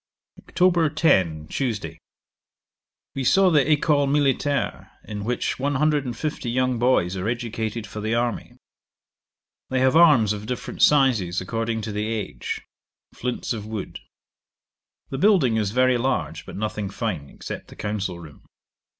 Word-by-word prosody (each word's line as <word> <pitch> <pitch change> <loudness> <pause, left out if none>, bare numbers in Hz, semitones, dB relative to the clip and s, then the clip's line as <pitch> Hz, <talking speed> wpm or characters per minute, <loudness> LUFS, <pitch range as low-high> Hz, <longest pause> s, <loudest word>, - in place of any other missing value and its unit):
'Oct. 170 -4 +2
10. 90 - +2
Tuesday. 115 - -3 1.1
We 135 - -3
saw 190 +7 +4
the 150 -1 +3
Ecole 145 -1 +3
Militaire, 140 0 0 0.2
in 105 -1 -6
which 120 +3 -2
one 140 +2 0
hundred 150 0 +2
and 120 -2 -5
fifty 150 -4 -3
young 125 0 0
boys 115 -7 +2
are 95 +2 -3
educated 115 -2 -3
for 105 - -7
the 110 +2 0
army. 120 -1 -2 1.1
They 130 - 0
have 130 +3 +3
arms 145 -11 +6
of 105 0 -7
different 125 - -5
sizes, 120 -12 +4
according 115 +3 -2
to 110 - -5
the 105 +1 -2
age; 105 - -4 0.5
flints 125 0 -3
of 105 -2 -6
wood. 110 -3 -6 1.1
The 135 - -3
building 165 - +4
is 105 -3 0
very 130 +2 +3
large, 115 - -2
but - - -8
nothing 105 -1 -3
fine, 95 - -4
except - - -8
the - - -13
council 100 -4 -3
room. 75 -4 -13
120 Hz, 145 wpm, -24 LUFS, 105-140 Hz, 1.1 s, arms